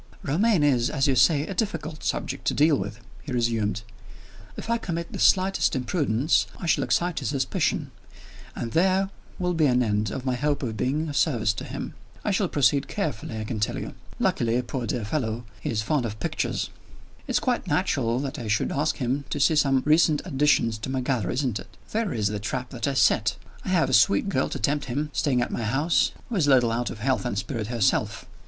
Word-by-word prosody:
"Romayne 180 +3 +2
is, 125 -5 +3
as 135 -2 0
you 135 - +2
say, 145 +3 +4
a 195 - -5
difficult 180 -6 -3
subject - - -3
to - - +1
deal 150 +1 +4
with," 105 +2 -5 0.2
he 145 - -8
resumed. 115 -3 0 0.7
"If - - -6
I 235 0 +1
commit 170 -5 -4
the - - -5
slightest 190 -4 +3
imprudence, 130 0 +1
I - - -7
shall 165 - +2
excite 175 -1 0
his - - -3
suspicion 135 -2 -1 0.6
and 115 - -4
there 190 - +2 0.3
will 180 -1 0
be 160 -3 +3
an 125 -1 +3
end 105 -1 0
of 130 +5 -5
my 130 - +1
hope 145 +2 -1
of 115 -4 -3
being 140 +9 -1
of 145 - -5
service 120 -9 +2
to 110 - -6
him. - - -6 0.3
I 210 - +1
shall 195 0 +1
proceed 140 0 +2
carefully, 140 - -3
I - - -3
can 110 0 -4
tell 105 - 0
you. - - -5 0.2
Luckily, 120 +1 +1
poor 120 -1 -4
dear 110 0 -2
fellow, 115 -2 -2
he - - -4
is 110 -2 -1
fond 145 +3 +1
of 105 0 -7
pictures! - - -2 0.6
It's - - +1
quite - - -1
natural 115 +2 +1
that 135 -2 -4
I 115 - -5
should 105 0 +1
ask 150 +3 0
him 135 +2 -1
to 145 - -2
see 155 +3 +4
some 135 -3 +3
recent 155 0 +4
additions 135 - +2
to 110 - -5
my 130 -1 -1
gallery 125 -7 -1
isn't 125 -5 -1
it? - - -13
There 220 -3 0
is 110 -3 -1
the 105 0 0
trap 125 +4 -4
that 125 +2 -3
I 140 - -1
set! - - +3 0.3
I - - -5
have - - +3
a - - -2
sweet - - +4
girl - - 0
to - - -4
tempt 145 +6 0
him, 145 +4 -3
staying 125 -4 +1
at - - -5
my - - -2
house, 135 +9 +2 0.2
who 230 - -2
is 155 -5 +2
a - - +3
little 125 -4 +5
out 120 +1 -1
of - - -7
health 130 +2 +1
and 120 -5 -2
spirits 110 0 -3
herself. 115 -5 0
135 Hz, 215 wpm, -25 LUFS, 115-155 Hz, 0.7 s, little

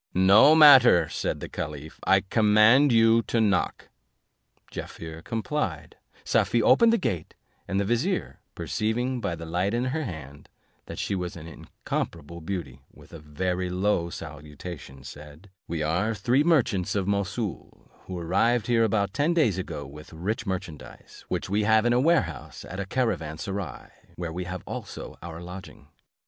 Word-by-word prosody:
"No 100 +11 +7
matter," 130 - +8
said - - -3
the - - -5
caliph, 75 +1 -7
"I 95 0 +5
command 110 +7 +4
you 115 0 +5
to 115 - 0
knock." 100 -5 0 0.8
Jaaffier 80 0 -8
complied; 110 - -3 0.3
Safie 120 -2 +2
opened 230 - +5
the 230 - +3
gate, 90 - -3 0.3
and 95 +2 -1
the 100 - 0
vizier, 130 - -1 0.2
perceiving 120 +4 -2
by 100 -5 -2
the 80 0 -8
light 90 +6 -1
in 120 +1 0
her 160 0 -1
hand, 75 - -9 0.4
that - - -8
she - - -2
was 90 -2 -3
an 85 -2 -9
incomparable 85 0 -6
beauty, 80 -6 -5
with - - -18
a 85 - -8
very 90 +5 -3
low 90 -1 0
salutation 75 -3 -9
said, 75 +7 -12 0.2
"We 80 -2 -2
are 90 +8 0
three 120 +8 +2
merchants 125 - +1
of 100 -2 0
Mossoul, 100 +1 -4 0.2
who 95 - -5
arrived 100 +8 +1
here 115 -2 +3
about 100 -2 0
ten 155 +4 +1
days 115 - +2
ago 75 -5 -5
with 75 +4 -12
rich 105 +8 -3
merchandise, 85 -6 -7
which - - -3
we 100 +3 0
have 110 +1 +3
in 120 - +3
a 120 - +3
warehouse 125 - 0
at 95 - -7
a 100 - -4
caravan 90 -11 -1
serai, 95 -5 -6 0.3
where 85 -2 -5
we 90 +1 -4
have 90 -1 -6
also - - -8
our 80 -1 -8
lodging. 90 +2 -11
95 Hz, 160 wpm, -26 LUFS, 85-115 Hz, 0.8 s, matter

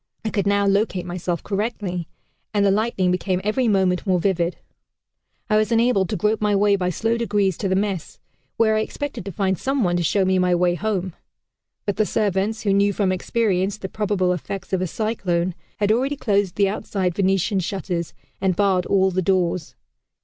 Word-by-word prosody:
I 220 - -1
could 200 -2 0
now 200 0 +3
locate 195 -2 +1
myself 175 -1 -3
correctly, 200 -4 -3 0.5
and 200 -1 +3
the 195 - +4
lightning 200 -3 +1
becoming 180 0 0
every 235 +4 +1
moment 190 -2 +1
more 185 -2 +3
vivid, 175 -2 0 0.9
I 215 -2 +3
was 215 +2 +1
enabled 230 -5 +3
to - - -1
grope 210 +5 0
my 210 -1 +2
way 200 0 +4
by 180 -2 -1
slow 225 +6 0
degrees 205 -5 +1
to 195 - -1
the 190 - +2
mess, 195 -4 -2 0.4
where 220 -1 +3
I - - +2
expected 280 -1 -4
to 200 - -4
find 190 -1 -1
some 270 -2 0
one 175 -2 +1
to - - 0
show 190 +4 +2
me 190 0 +2
my 180 -1 +3
way 175 0 +2
home; 190 -1 -2 0.7
but 205 - -1
the 215 - +3
servants, 210 +1 0
who 200 -2 +2
knew 200 +1 +3
from 195 -1 +1
experience 195 0 0
the 190 -2 -6
probable 200 -4 0
effects 195 +3 -6
of 185 - +1
a 185 - 0
cyclone, 185 -3 -1 0.2
had 205 0 +2
already 265 +6 +1
closed 200 -8 0
the 200 -1 +3
outside 195 -3 -2
Venetian 195 +1 +1
shutters 180 -2 -3 0.3
and 190 -2 +1
barred 190 -2 +2
all 190 -1 +3
the 185 +1 0
doors. 180 -3 0
195 Hz, 195 wpm, -22 LUFS, 180-210 Hz, 0.9 s, the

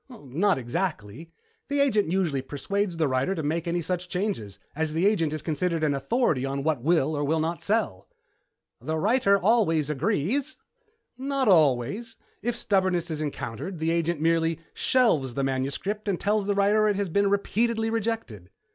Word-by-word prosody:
"Not 190 - 0
exactly. 130 - -4 0.4
The 285 0 -1
agent 215 - +2
usually 170 -8 0
persuades 180 +7 -3
the 160 -2 +2
writer 130 +8 0
to 160 - -3
make 165 +3 -1
any 170 0 -1
such 180 +1 -3
changes, 180 - -3 0.2
as 155 0 -1
the 165 +4 +1
agent 170 -7 +2
is 155 -1 -4
considered 165 0 -1
an 150 -2 +2
authority 155 - 0
on 135 0 -2
what 150 -5 0
will 155 0 +2
or 145 - -1
will 160 +3 +1
not 165 +2 -2
sell." 205 - -1 0.7
"The 155 +5 -2
writers 200 +2 +3
always 165 -9 +3
agree?" 195 - 0 0.8
"Not 275 -1 -1
always. 160 - +2 0.2
If 240 +1 -1
stubbornness 185 -6 0
is 155 -1 -3
encountered, 150 - -5
the 160 +1 0
agent 170 -1 0
merely 165 0 +1
shelves 155 - +2
the 140 - -1
manuscript 140 +11 -2
and 195 -3 0
tells 205 -1 0
the 205 - +1
writer 205 +2 +3
it 205 - +2
has 200 0 -1
been 200 +4 +2
repeatedly 225 +3 0
rejected." 220 - -3
170 Hz, 165 wpm, -26 LUFS, 150-205 Hz, 0.8 s, writers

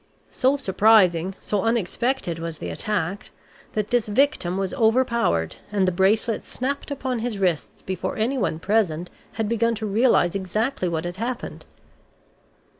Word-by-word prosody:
So 265 +3 +2
surprising, 190 -6 +3
so 205 -2 -1
unexpected 225 -3 0
was 165 -1 -5
the - - -5
attack, 200 -3 -2 0.4
that 215 -1 -1
this 240 -3 +1
victim 210 -6 +2
was 195 -1 -2
overpowered 225 - +1
and 195 -2 +2
the - - +3
bracelets 205 +5 +1
snapped 280 +4 -3
upon 260 -3 -2
his 230 -2 -3
wrists 180 -5 -1
before 185 0 -3
anyone 230 -6 0
present 180 -3 0 0.2
had 225 -1 -2
begun 230 +1 +1
to 220 0 -4
realize 215 -4 +3
exactly 195 +1 -1
what 165 0 -2
had 175 +1 -5
happened. 240 +3 -5
210 Hz, 140 wpm, -24 LUFS, 180-235 Hz, 0.4 s, surprising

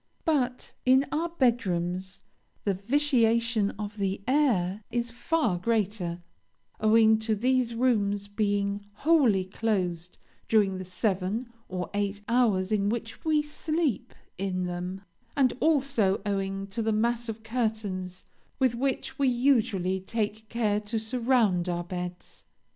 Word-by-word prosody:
but 255 -6 0
in 260 +2 +5
our 330 +3 0
bed 255 -7 +2
rooms 180 +1 -3 0.4
the 200 - +1
vitiation 230 -1 +2
of 210 0 -6
the 195 -1 -1
air 220 -9 +2
is 240 -1 -2
far 240 - 0
greater, 190 -5 -1 0.6
owing 220 0 +5
to 220 0 0
these 250 +1 +1
rooms 205 -5 +1
being 205 -1 -1 0.2
wholly 255 - +4
closed 185 -4 -2 0.3
during 200 -4 +3
the - - -4
seven 195 +4 -1 0.2
or 180 -1 -3
eight 205 0 -1
hours 220 -6 +2
in 205 -1 +2
which 225 0 -4
we 310 -2 +2
sleep 305 - -2 0.2
in 185 -2 -1
them, 180 +2 -4 0.4
and, 260 -3 +4
also, 275 -10 +2
owing 195 -1 -2
to 200 +4 -3
the 220 0 +1
mass 235 +2 0
of 220 0 -6
curtains 215 -6 -3 0.3
with 260 -3 +2
which 265 +3 -2
we 275 - +3
usually 225 -8 +2
take 215 +2 -3
care 215 -3 +1
to 210 +2 -4
surround 220 -6 +1
our 175 0 -1
beds. 180 0 -7
215 Hz, 130 wpm, -28 LUFS, 190-245 Hz, 0.6 s, in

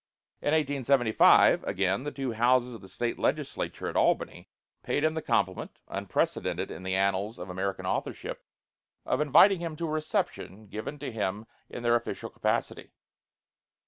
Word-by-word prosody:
In - - -5
1875, 140 -6 +4
again, 95 +7 0
the 145 - -3
two 135 -3 -3
houses 125 +2 +2
of 115 - -10
the 95 - -13
State 120 +5 -3
Legislature - - -2
at - - -5
Albany - - 0 0.3
paid 145 - -1
him 155 0 +2
the 160 - -3
compliment, 95 - -1
unprecedented - - -2
in - - -8
the 95 0 -2
annals 100 +3 0
of 90 +1 -7
American 95 +1 -3
authorship, - - -3 0.6
of 145 - 0
inviting 170 +6 +6
him 165 -2 -4
to 170 - -3
a 155 - -3
reception 130 -8 -3
given 110 +8 -6
to 140 -2 -5
him 105 -1 -3 0.2
in 120 - -7
their 120 0 +3
official 120 0 -2
capacity. - - -2
120 Hz, 155 wpm, -28 LUFS, 100-145 Hz, 0.6 s, inviting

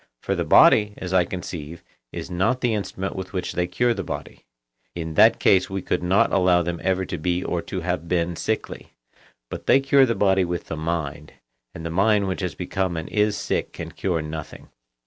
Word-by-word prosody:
For - - 0
the - - -1
body, 105 -1 +5
as 90 0 -5
I 90 -2 +4
conceive, 85 -3 -7 0.3
is - - -7
not 95 +9 0
the 120 -3 +1
instrument 95 -2 -4
with 95 0 -6
which 90 -2 -3
they 90 0 0
cure 120 +7 +1
the 100 -3 -4
body; - - -7 0.5
in 80 -2 -4
that - - +5
case 95 -1 +3
we 95 -1 -4
could - - -1
not 90 +3 +2
allow 90 -2 +4
them 85 0 -4
ever 95 0 0
to 85 - -5
be 90 +2 -1
or - - -2
to - - -5
have 85 - -3
been 85 0 0
sickly; 110 +6 -4 0.6
but - - -7
they 135 - +6
cure 135 0 +4
the 115 - 0
body 95 -2 +3
with 85 -1 -3
the - - -6
mind, 75 -2 -4 0.4
and 80 - -7
the 80 - -3
mind 100 +3 +2
which 95 +1 -3
has 90 -4 -3
become 90 -1 -2
and 80 - -5
is 105 -1 +1
sick - - -2
can - - -7
cure 85 -5 -2
nothing. 75 0 -8
90 Hz, 205 wpm, -23 LUFS, 85-100 Hz, 0.6 s, they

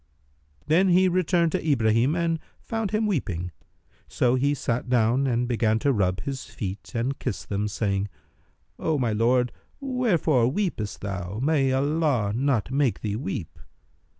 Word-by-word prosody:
Then 180 +5 +3
he 185 +1 +5
returned 175 -2 +2
to - - -1
Ibrahim 120 -1 +2
and 165 -1 0 0.2
found 225 -3 -3
him 215 +2 0
weeping; 90 - -2 0.6
so 125 -1 +1
he 140 +3 +2
sat 125 -1 -2
down 125 +2 +3
and 120 -1 0
began 110 -2 +1
to 140 +3 +1
rub[FN#309] 95 -4 +1
his 135 +2 -5
feet 100 -1 -6
and 125 +4 -1
kiss - - -4
them, 100 +1 -2
saying, 100 -2 -1 0.7
"O 160 -2 0
my 120 -4 0
lord, 125 +3 +2 0.3
wherefore 205 - +2
weepest 130 - -2
thou? 95 -1 -4
May 140 -3 +2
Allah 140 -6 +1
not 130 -2 0
make 135 -3 +1
thee 105 -2 -2
weep!" 95 - -5
130 Hz, 150 wpm, -25 LUFS, 110-160 Hz, 0.7 s, he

